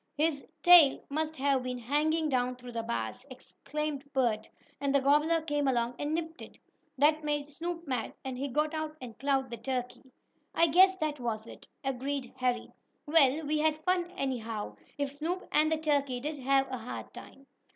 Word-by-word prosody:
"His 300 -1 0 0.2
tail 345 -6 +8
must 315 +1 -2
have 270 -1 +2
been 250 0 -4
hanging 300 +6 +1
down 250 -2 0
through 250 0 -10
the 230 -1 -2
bars," 115 - -3
explained 285 +2 -5
Bert, 230 -5 +1 0.3
"and 280 0 0
the - - +6
gobbler 300 +4 +3
came 295 -2 -1
along 240 -2 +1
and 295 +2 -1
nipped 325 0 -4
it. - - -11 0.4
That 305 +3 +4
made 295 -1 -2
Snoop 335 +2 -5
mad, 250 -4 -2
and 260 -1 -3
he 275 +3 -3
got 300 +4 0
out 310 0 -4
and 240 -3 -9
clawed 270 -2 0
the 235 - -4
turkey." 255 0 -4 0.4
"I 335 0 +4
guess 375 +4 +6
that 305 -4 -2
was 225 -3 -3
it," - - -12 0.2
agreed 270 0 -3
Harry. 250 -1 -1 0.3
"Well, 300 -1 +4
we 305 +1 0
had 310 0 +1
fun 360 -1 +1
anyhow, 225 - -3 0.2
if 285 -1 -1
Snoop 330 +6 -3
and 310 +1 +3
the 320 - +2
turkey 285 -5 0
did 295 +3 -4
have 270 +1 +2
a 255 - -3
hard 230 +2 -7
time." 275 - -12
280 Hz, 180 wpm, -30 LUFS, 255-310 Hz, 0.4 s, tail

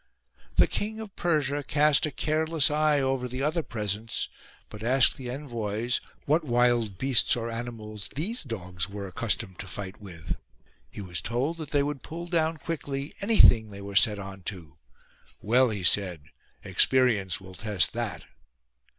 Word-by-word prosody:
The - - +6
King 220 +1 -3
of 215 -3 -8
Persia 145 -4 0
cast 150 +1 +3
a - - -5
careless 155 +1 +1
eye 150 -1 +3
over 130 -1 0
the 130 +2 -4
other 155 +3 +1
presents, 110 -4 -3 0.4
but 105 - -11
asked 125 +3 +4
the 125 -2 -7
envoys 120 -4 -2 0.2
what 155 +4 +2
wild 120 -6 +2
beasts 130 -2 +4
or 115 -1 -3
animals 115 -3 -6
these 205 - -2
dogs 90 - -4
were 100 0 -6
accustomed 95 0 -1
to 95 - -6
fight 100 +1 -7
with. 85 -5 -6 0.5
He 105 - -8
was 90 -3 -4
told 130 +9 -1
that 155 -4 -7
they 145 -1 +2
would 145 -2 -3
pull 170 +2 -7
down 165 -2 0
quickly 145 -3 -4
anything 160 - +6
they 100 -1 -10
were 100 0 -7
set 105 +1 +5
on 95 -1 -8
to. 85 -8 -11 0.6
"Well," 125 +4 +3
he 105 -4 -4
said, 90 -4 +2 0.4
"experience 115 -8 +3
will 95 -1 -12
test 95 -5 0
that." - - -3
120 Hz, 160 wpm, -27 LUFS, 100-150 Hz, 0.6 s, The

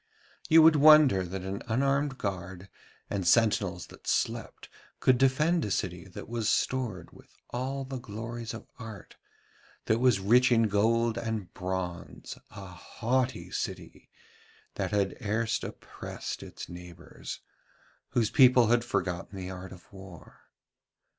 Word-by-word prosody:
You 160 0 +8
would 160 -1 +7
wonder 150 -9 +7
that 90 +1 -6
an 95 +1 -4
unarmed 135 +3 +1
guard 95 -2 -5 0.4
and 95 -3 -2
sentinels 100 -3 +2
that - - -16
slept - - -2 0.3
could 130 -2 +3
defend 150 +6 +3
a - - -2
city 90 -1 -3
that 90 - -9
was 115 -2 -1
stored 110 -10 -1
with - - -19
all 135 +2 -3
the 130 -1 -5
glories 115 +1 -6
of 110 - -10
art, 110 -4 -10 0.7
that 110 +1 +2
was 125 -5 +4
rich 120 +6 +4
in 115 -1 +5
gold 115 +3 +2
and 110 -6 -4
bronze, 90 -2 -5
a 100 -3 -10
haughty 120 +7 -2
city - - -6 0.6
that - - -2
had 100 -2 0
erst 110 +1 -1
oppressed - - -7
its - - -9
neighbours, 90 -1 -9 0.7
whose 115 -3 +1
people 125 -3 +6
had 120 0 +3
forgotten 100 -3 -3
the 95 0 -5
art 95 0 -8
of 95 +2 -15
war. 95 -3 -14
110 Hz, 135 wpm, -29 LUFS, 95-125 Hz, 0.7 s, You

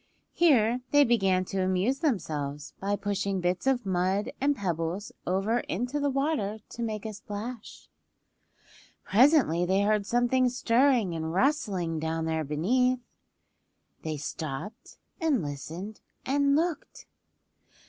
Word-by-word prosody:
Here 250 -8 +3
they 290 0 +6
began 195 -7 +2
to 195 +1 -2
amuse 190 +8 +1
themselves 150 - -2
by 200 +1 0
pushing 200 -1 -2
bits 180 +6 -1
of 255 -4 +2
mud 190 +2 0
and 285 +1 +2
pebbles 175 - -3 0.2
over 195 +6 +1
into 245 +9 -3
the 285 0 +1
water 275 -7 -1
to 235 - -8
make 220 -2 -3
a 220 - -4
splash. 210 +3 -8 1.2
Presently 230 - +4
they 190 +3 +2
heard 210 -1 +1
something 245 +2 +2
stirring 245 -4 +2
and 160 -1 -3
rustling 185 - 0
down 160 +1 -2
there 160 -1 -1
beneath. 245 - +1 1.0
They 155 -1 -3
stopped 155 - -6 0.2
and 310 - +1
listened 165 +9 -6 0.2
and 280 +1 +2
looked. 330 +1 -2
205 Hz, 125 wpm, -28 LUFS, 180-255 Hz, 1.2 s, they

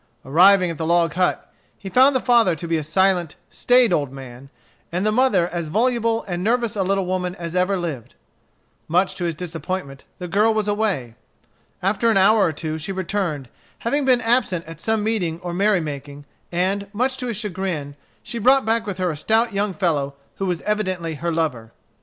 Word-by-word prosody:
Arriving 180 +5 +5
at 165 - -8
the - - -2
log 170 -2 +2
hut, 180 0 -1 0.2
he 195 - -10
found 260 +7 +5
the - - +3
father 235 -8 +3
to 170 +2 -7
be 165 - 0
a 155 - -1
silent, 175 0 +1 0.2
staid 245 -5 +3
old 145 -5 0
man, 135 0 -11 0.4
and 180 +4 -1
the 215 - +2
mother 215 -7 +3
as 170 -2 -4
voluble 230 +3 +1
and 175 -1 -3
nervous 235 0 0
a 200 - 0
little 195 0 0
woman 180 0 -2
as 170 -1 -6
ever 185 +2 +2
lived. 160 -10 -5 0.7
Much 180 +3 +2
to 175 - -4
his 170 -2 -2
disappointment, 165 -4 -5
the 180 - -6
girl 210 +5 +2
was 215 -1 0
away. 205 - -1 0.7
After 205 +4 +2
an 220 - +3
hour 205 +2 +5
or 165 - +2
two 155 +1 -5
she 160 +5 -5
returned, 185 -7 -2 0.3
having 285 +5 -1
been 255 -2 +3
absent 225 -8 +1
at 165 0 -10
some 220 -1 0
meeting 185 -7 -1
or 175 -1 -5
merry 200 0 +2
making, 145 -1 -7 0.3
and, 190 +3 -1
much 255 +5 0
to 250 -1 -4
his 230 -4 -3
chagrin, 185 -8 -4 0.3
she 235 - -5
brought 260 +3 +4
back 225 0 0
with 195 -3 -4
her 180 -2 0
a - - -5
stout 220 +8 +1
young 200 +1 0
fellow 150 -7 -1 0.2
who 195 - -2
was 175 -2 -2
evidently 185 -6 -2
her 170 +3 -3
lover. 135 -9 -2
185 Hz, 195 wpm, -22 LUFS, 165-215 Hz, 0.7 s, Arriving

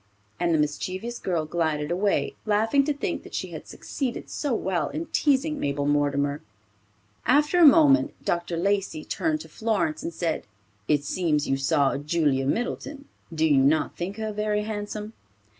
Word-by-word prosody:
and 175 -1 +1
the 160 - +3
mischievous 185 +10 -2
girl 170 -4 -1
glided 155 -2 -1
away, 195 +3 0
laughing 220 +6 +3
to 295 - 0
think 285 - -3
that - - -10
she - - -3
had - - -8
succeeded 260 -4 -5
so 290 - -2
well 185 -9 0
in 325 - -4
teasing 295 +1 +1
Mabel 140 0 -1
Mortimer. 145 0 +1 0.9
After 295 +6 +4
a 340 - +8
moment, 290 -1 +5
Dr. 170 0 -1
Lacey 195 -3 -1
turned 310 -1 -1
to - - -10
Florence 205 -9 -1
and - - -4
said 165 - -2 0.4
"It 145 -1 +2
seems 150 -1 0
you 135 - +2
saw 135 0 +2
Julia 145 -3 +1
Middleton. 275 - -3 0.3
Do 160 -1 +1
you 145 -4 +4
not 150 +3 +2
think 190 +4 -5
her 220 -1 -3
very 210 0 0
handsome?" 210 0 -5
180 Hz, 160 wpm, -25 LUFS, 150-235 Hz, 0.9 s, a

